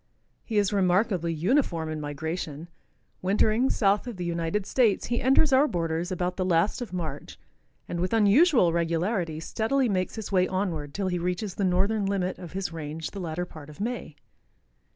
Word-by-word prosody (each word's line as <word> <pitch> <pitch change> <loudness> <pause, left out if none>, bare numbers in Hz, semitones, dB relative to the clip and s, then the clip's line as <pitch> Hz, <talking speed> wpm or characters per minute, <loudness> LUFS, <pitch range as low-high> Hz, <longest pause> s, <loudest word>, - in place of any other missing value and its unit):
He 220 - -3
is 205 0 +2
remarkably 185 -2 +2
uniform 170 - +1
in 155 -1 -4
migration. 155 +2 -5 0.5
Wintering 215 +6 +2
south 205 +2 +2
of 235 -5 -6
the 180 - -4
United 170 +3 -1
States, 230 -5 +2
he 240 0 -1
enters 270 +3 +4
our 275 +3 +5
borders 165 - -2
about 180 0 -2
the 185 - 0
last 185 +6 +1
of 235 -7 -5
March 160 -6 -5 0.5
and 170 - -4
with 180 +1 -1
unusual 225 - +5
regularity 170 0 0
steadily 240 +10 0
makes 185 -4 -1
his 220 -3 -6
way 185 -1 +3
onward 170 -7 -3
till 195 -1 -1
he 180 -1 -1
reaches 180 +3 -2
the 200 - -2
northern 195 +3 +1
limit 190 -2 -1
of 175 -3 -9
his 190 -3 -3
range 155 0 -5
the 200 - -7
latter 175 0 -3
part 155 -4 -12
of 150 - -13
May. 225 -7 -4
185 Hz, 175 wpm, -27 LUFS, 165-210 Hz, 0.5 s, our